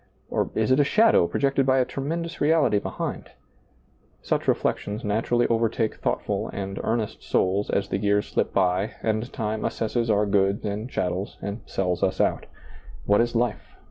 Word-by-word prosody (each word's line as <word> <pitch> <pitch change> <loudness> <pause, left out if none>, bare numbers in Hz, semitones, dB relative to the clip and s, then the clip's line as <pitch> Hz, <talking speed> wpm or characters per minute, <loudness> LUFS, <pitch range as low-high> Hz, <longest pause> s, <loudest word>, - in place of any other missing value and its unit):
Or - - 0
is - - +1
it 130 - +4
a - - +6
shadow 215 - +4
projected 135 +3 +1
by 130 0 +4
a 130 - +3
tremendous 165 +6 -4
reality 150 -8 +3
behind? - - -5 0.9
Such - - -1
reflections 105 +2 0
naturally 115 +3 +1
overtake 115 -1 +1
thoughtful - - -1
and 95 -1 -5
earnest 110 -2 -2
souls 95 +3 0
as 100 - 0
the 95 - -1
years 105 0 +2
slip - - -1
by 95 +3 +1
and 110 +3 -1
time 110 -3 -3
assesses 115 +1 -1
our 105 -1 +3
goods 100 0 +1
and 105 +4 -3
chattels 90 -2 -2
and 100 +3 -5
sells 90 -2 -1
us 95 0 0
out - - +1 0.6
What 105 +5 +4
is 120 0 -1
life? 120 +1 -1
110 Hz, 165 wpm, -25 LUFS, 100-120 Hz, 0.9 s, a